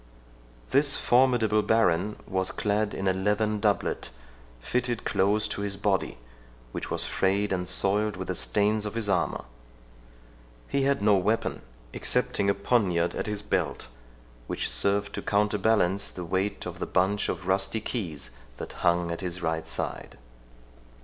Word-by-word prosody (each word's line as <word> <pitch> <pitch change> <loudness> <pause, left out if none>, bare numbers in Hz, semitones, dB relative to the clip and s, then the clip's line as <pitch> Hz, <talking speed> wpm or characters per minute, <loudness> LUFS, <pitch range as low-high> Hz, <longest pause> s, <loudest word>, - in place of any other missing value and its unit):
This 140 0 +4
formidable 120 -4 +3
baron 105 -2 +2
was 95 0 -1
clad 105 0 -1
in 95 - -2
a 95 - +3
leathern 105 +3 0
doublet, 105 -1 0 0.5
fitted 120 - -2
close 105 +3 +2
to - - -3
his 100 -1 -2
body, 100 - 0 0.5
which - - -5
was - - 0
frayed 100 +1 +1
and 90 -1 -2
soiled 105 +2 +2
with 95 - -5
the 95 - -1
stains 105 +3 +1
of 105 - -7
his 115 -2 -1
armour. 95 -4 0 1.2
He 140 - 0
had 140 -4 +1
no 105 -1 +5
weapon, 105 +5 0 0.3
excepting 100 - +1
a 100 - +2
poniard 90 -8 +1
at - - -3
his 105 -1 -4
belt, 95 -10 -2 0.6
which - - -1
served 100 0 +1
to - - -4
counterbalance 105 -2 +2
the 90 - -7
weight 95 +4 -1
of 90 0 -6
the - - -3
bunch 95 +3 +1
of - - -4
rusty 95 +3 +1
keys 85 - -5 0.3
that - - -7
hung 85 0 +2
at 85 - -4
his 90 -1 -4
right 80 0 -1
side. 80 - -5
100 Hz, 150 wpm, -27 LUFS, 95-105 Hz, 1.2 s, no